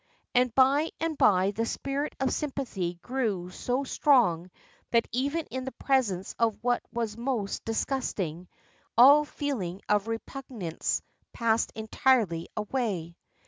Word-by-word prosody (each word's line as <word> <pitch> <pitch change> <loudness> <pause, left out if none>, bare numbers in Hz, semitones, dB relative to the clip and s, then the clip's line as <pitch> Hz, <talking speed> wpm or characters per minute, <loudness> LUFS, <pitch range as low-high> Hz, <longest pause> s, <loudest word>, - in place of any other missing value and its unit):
And 250 0 +3
by 275 +4 +4
and 325 -1 -1
by 195 -6 +4
the 225 +3 -2
spirit 275 +4 -3
of 265 -1 +1
sympathy 250 - -3
grew 215 -9 -2
so 250 +8 -1
strong 230 - +3 0.4
that 235 -1 +2
even 280 +6 -1
in 260 +1 -3
the 265 - -5
presence 215 -9 0
of 230 -2 +2
what 245 0 +2
was 230 -3 -2
most 235 -5 -2
disgusting 200 - -2 0.5
all 285 +5 +8
feeling 230 - -3
of 210 0 +2
repugnance 225 - -3 0.3
passed 230 -1 +1
entirely 220 -6 +1
away. 210 -7 -2
235 Hz, 125 wpm, -28 LUFS, 195-270 Hz, 0.5 s, all